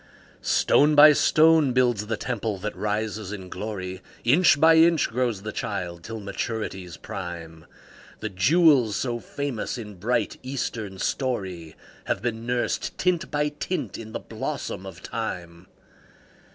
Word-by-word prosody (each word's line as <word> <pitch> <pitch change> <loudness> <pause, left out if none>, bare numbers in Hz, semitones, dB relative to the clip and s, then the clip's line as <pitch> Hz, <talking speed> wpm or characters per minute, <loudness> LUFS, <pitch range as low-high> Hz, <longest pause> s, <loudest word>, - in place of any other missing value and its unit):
Stone 150 +1 +3
by 150 +1 +9
stone 155 -2 +4
builds 120 -5 +2
the 115 -1 -1
temple 110 -3 -3
that 105 +3 -5
rises 105 -1 -2
in 95 -3 -7
glory, 95 -2 -5 0.2
Inch 145 +4 +5
by 160 +2 +7
inch 165 -1 +5
grows 115 -4 -1
the 110 - -4
child 90 -5 -4
till 115 -1 -6
maturity's 100 -4 -4
prime; 85 -4 -7 0.5
The 110 - -3
jewels 125 - +4
so 120 -2 -2
famous 140 -3 -4
in 105 -3 -7
bright, 115 +8 -1
Eastern 115 -6 -4
story 95 - -3 0.3
Have - - -1
been 115 -1 -3
nursed, 125 0 -1
tint 180 -1 0
by 150 0 0
tint, 150 +5 -4
in 110 -1 -8
the - - -4
blossom 115 -5 -5
of 90 -2 -11
Time. 90 -6 -5
110 Hz, 140 wpm, -25 LUFS, 95-135 Hz, 0.5 s, by